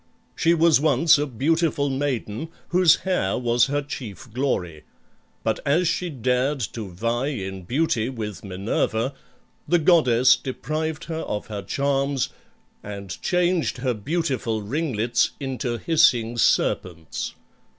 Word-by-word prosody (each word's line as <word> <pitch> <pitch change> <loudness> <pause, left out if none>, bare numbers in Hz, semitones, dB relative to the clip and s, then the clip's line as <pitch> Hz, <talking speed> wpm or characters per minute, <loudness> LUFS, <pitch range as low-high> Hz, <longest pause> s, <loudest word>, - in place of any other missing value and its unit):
She 170 +1 +3
was 165 -3 +4
once 160 0 +4
a 150 - 0
beautiful 145 +3 +1
maiden 135 -1 -2 0.2
whose 180 -2 +5
hair 180 - +1
was 120 0 +2
her 145 +1 -1
chief 120 -4 -8
glory, 90 - -1 0.6
but - - 0
as 165 +5 +2
she 180 +2 -1
dared 130 +1 0
to 110 -4 -6
vie 115 +8 -1
in 95 -9 -5
beauty 125 - 0
with 105 -7 -6
Minerva, 110 +6 -1 0.5
the 175 - +4
goddess 130 -8 +5
deprived 155 +4 -4
her 160 -1 -4
of 105 0 -4
her 100 - -3
charms 140 +4 0 0.5
and 100 -5 -7
changed 180 -4 +1
her 125 0 0
beautiful 120 -3 -2
ringlets 120 -2 0
into 130 -3 -3
hissing 125 -6 +3
serpents. 85 -7 0
130 Hz, 125 wpm, -24 LUFS, 110-155 Hz, 0.6 s, whose